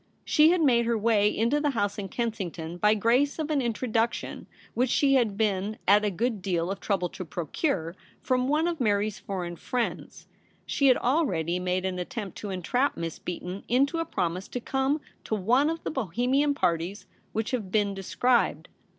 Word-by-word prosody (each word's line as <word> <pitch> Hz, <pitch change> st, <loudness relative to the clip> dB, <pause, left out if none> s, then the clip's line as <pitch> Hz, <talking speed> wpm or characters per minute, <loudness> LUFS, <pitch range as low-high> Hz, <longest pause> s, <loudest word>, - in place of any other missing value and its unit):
She 305 Hz, +1 st, +5 dB
had 350 Hz, 0 st, +3 dB
made 235 Hz, -4 st, +4 dB
her 235 Hz, -1 st, +2 dB
way 210 Hz, -1 st, +3 dB
into 235 Hz, +8 st, +1 dB
the 295 Hz, -, +2 dB
house 205 Hz, 0 st, 0 dB
In 195 Hz, -1 st, -5 dB
Kensington 180 Hz, -8 st, -4 dB
by 210 Hz, +3 st, +4 dB
grace 245 Hz, +7 st, +2 dB
of 310 Hz, -1 st, -2 dB
an 295 Hz, -, +2 dB
Introduc 235 Hz, -1 st, 0 dB
tion -, -, -7 dB, 0.3 s
which 250 Hz, +1 st, +1 dB
she 275 Hz, +2 st, +3 dB
had 230 Hz, -7 st, +2 dB
been 210 Hz, -1 st, 0 dB
at 205 Hz, +2 st, +6 dB
a 210 Hz, -, +2 dB
good 220 Hz, +2 st, -1 dB
deal 180 Hz, -1 st, -1 dB
of 195 Hz, -, -4 dB
trouble 190 Hz, -4 st, 0 dB
to 185 Hz, -, -7 dB
procure 170 Hz, -, -2 dB, 0.2 s
from 255 Hz, -1 st, 0 dB
one 305 Hz, +4 st, +2 dB
of 340 Hz, -2 st, -2 dB
Mary's 210 Hz, -2 st, +1 dB
foreign 175 Hz, -3 st, -5 dB
friends. 245 Hz, +5 st, -4 dB, 0.4 s
She 280 Hz, -, +2 dB
had 255 Hz, -, +6 dB
already 185 Hz, -, +1 dB
made 180 Hz, +1 st, -1 dB
an 185 Hz, -1 st, -2 dB
attempt 195 Hz, +2 st, -5 dB
to 210 Hz, -, -5 dB
entrap 245 Hz, +9 st, 0 dB
Miss 165 Hz, -1 st, -4 dB
Beaton 180 Hz, +2 st, -5 dB
into 275 Hz, +7 st, +2 dB
a -, -, +1 dB
promise 180 Hz, -, -2 dB
to 250 Hz, -, -4 dB
come 270 Hz, +4 st, 0 dB, 0.2 s
to 220 Hz, -, -2 dB
one 245 Hz, +9 st, +3 dB
of 330 Hz, 0 st, -4 dB
the -, -, -3 dB
Bohemian 265 Hz, -, +1 dB
parties 170 Hz, -1 st, -1 dB, 0.3 s
which 220 Hz, +2 st, -2 dB
have 220 Hz, -8 st, -3 dB
been 205 Hz, -1 st, +2 dB
described. 235 Hz, +6 st, +1 dB
220 Hz, 185 wpm, -27 LUFS, 190-255 Hz, 0.4 s, at